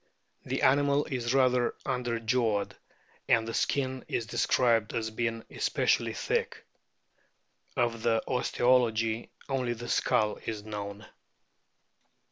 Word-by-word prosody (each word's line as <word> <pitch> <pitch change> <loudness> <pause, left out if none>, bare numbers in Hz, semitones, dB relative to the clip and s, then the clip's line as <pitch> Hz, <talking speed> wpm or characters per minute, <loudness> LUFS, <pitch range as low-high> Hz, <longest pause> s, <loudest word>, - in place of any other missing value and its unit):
The - - -2
animal 140 +1 +4
is 125 -4 -2
rather 125 -2 +3
underjawed, 115 -3 0 0.6
and 115 -1 +4
the 115 - -4
skin 130 0 0
is 115 - -2
described 115 -1 +2
as 110 -1 -2
being 115 0 -2
especially - - +1
thick. - - -2 1.1
Of 115 -1 0
the 115 -1 +2
osteology 120 -3 +1 0.2
only 130 -3 -1
the 120 +1 -8
skull 105 -1 +1
is 110 -2 -3
known. 105 0 -6
115 Hz, 105 wpm, -29 LUFS, 110-125 Hz, 1.1 s, animal